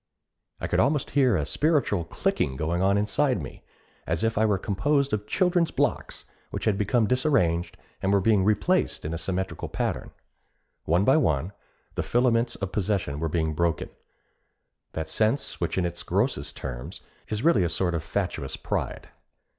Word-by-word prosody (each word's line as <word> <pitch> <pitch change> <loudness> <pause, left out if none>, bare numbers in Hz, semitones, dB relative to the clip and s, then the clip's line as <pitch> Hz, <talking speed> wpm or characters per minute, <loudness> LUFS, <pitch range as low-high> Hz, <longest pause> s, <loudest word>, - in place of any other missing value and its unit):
I - - -3
could - - 0
almost 140 +2 +1
hear 130 -7 +3
a 75 - -1
spiritual 140 - +1
clicking 70 -4 -1
going 80 +5 -1
on 100 +1 +3
inside 105 +4 +1
me, 70 - -8 0.5
as 80 +3 -1
if 115 0 +1
I 110 +1 +3
were 105 -2 +2
composed 140 +9 0
of 105 0 -1
children's 180 - +2
blocks - - -1 0.2
which - - -5
had 110 - +3
become 105 +3 +2
disarranged 95 - +1 0.2
and 95 - +1
were 100 - +4
being 100 0 +3
replaced 110 - +1
in 80 - -3
a 80 - -3
symmetrical 95 +3 -3
pattern. - - -2 0.8
One 85 +5 +2
by 135 - +5
one, 80 - +1 0.4
the - - -1
filaments 120 -1 +2
of 95 -2 -4
possession 95 -8 -1
were 80 0 -1
being 80 -1 0
broken 85 0 -1 1.0
that 80 -1 -3
sense 110 - 0
which 85 - -1
in 90 - +2
its 85 0 -4
grossest - - -1
terms 65 +8 -6 0.3
is 110 +2 -3
really 135 - +4
a 85 - +1
sort 90 0 0
of 85 - -1
fatuous 90 -8 -3
pride. - - -3
100 Hz, 170 wpm, -26 LUFS, 85-120 Hz, 1.0 s, by